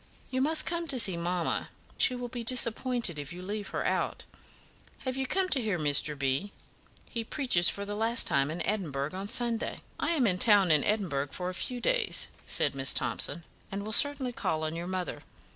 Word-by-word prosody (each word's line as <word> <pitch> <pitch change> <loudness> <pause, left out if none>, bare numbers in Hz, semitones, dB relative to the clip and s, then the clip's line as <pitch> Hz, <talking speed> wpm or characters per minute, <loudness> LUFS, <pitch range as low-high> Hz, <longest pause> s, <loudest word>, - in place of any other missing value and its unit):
You 260 0 -1
must 310 +3 +4
come 340 -1 -3
to 275 - +2
see 195 -6 +6
mamma; 170 0 -2 0.3
she 250 - +2
will 245 0 -5
be 240 0 -6
so - - -8
disappointed 235 - +2
if 145 0 -7
you 180 +1 -8
leave 205 +1 -5
her - - -4
out. - - -2 0.8
Have 255 -1 -2
you 265 -1 -2
come 380 +5 +1
to 270 - +1
hear 210 -5 -1
Dr. 150 -1 +3
B? 140 +8 -2 0.6
He 230 -2 -4
preaches 225 - +2
for 200 - -4
the 205 - -5
last 225 +3 +2
time 140 +1 +1
in 165 +3 -4
Edinburgh 155 -8 -3
on 195 +2 -6
Sunday." 235 -1 0 0.2
"I 335 - 0
am 295 -6 +1
to 180 -4 +5 0.2
be 160 - +4
in 150 - +3
Edinburgh 175 -10 -1
for 180 +6 -5
a - - -10
few 245 +6 -4
days," - - +1 0.2
said 145 - +2
Miss 135 0 +4
Thomson, 165 +4 0 0.3
"and 200 +1 -5
will 215 - -4
certainly 275 -1 +3
call 155 -8 -2
on 155 +1 -3
your 170 +1 -5
mother." 185 -1 -4
200 Hz, 205 wpm, -29 LUFS, 170-250 Hz, 0.8 s, see